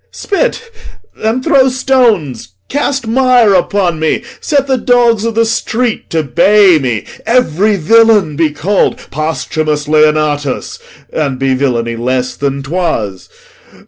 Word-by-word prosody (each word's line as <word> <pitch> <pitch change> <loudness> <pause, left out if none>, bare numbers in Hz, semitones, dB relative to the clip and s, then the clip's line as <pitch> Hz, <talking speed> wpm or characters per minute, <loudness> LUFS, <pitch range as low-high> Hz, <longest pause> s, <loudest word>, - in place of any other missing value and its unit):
Spit, 465 +2 -3 0.4
and 225 +4 -2
throw 265 -1 +4
stones, 225 - 0 0.2
cast 275 -2 -2
mire 245 -2 +3
upon 180 -2 0
me, 160 0 -1 0.2
set 285 -3 0
The 265 -2 0
dogs 235 -3 +2
o' - - -1
th' 230 +1 +1
street 230 +1 -2
to 160 -1 -1
bay 185 +6 +4
me. 120 -6 -3 0.2
Every 215 -4 +2
villain 210 -2 +3
Be 160 +1 +1
call'd 185 +7 0
Posthumus 155 0 -2
Leonatus, 150 -2 0 0.3
and 140 -4 -2
Be 135 0 0
villainy 120 -3 -1
less 125 +1 -2
than 140 -1 -3
'twas! 135 - -3
175 Hz, 125 wpm, -12 LUFS, 145-230 Hz, 0.4 s, throw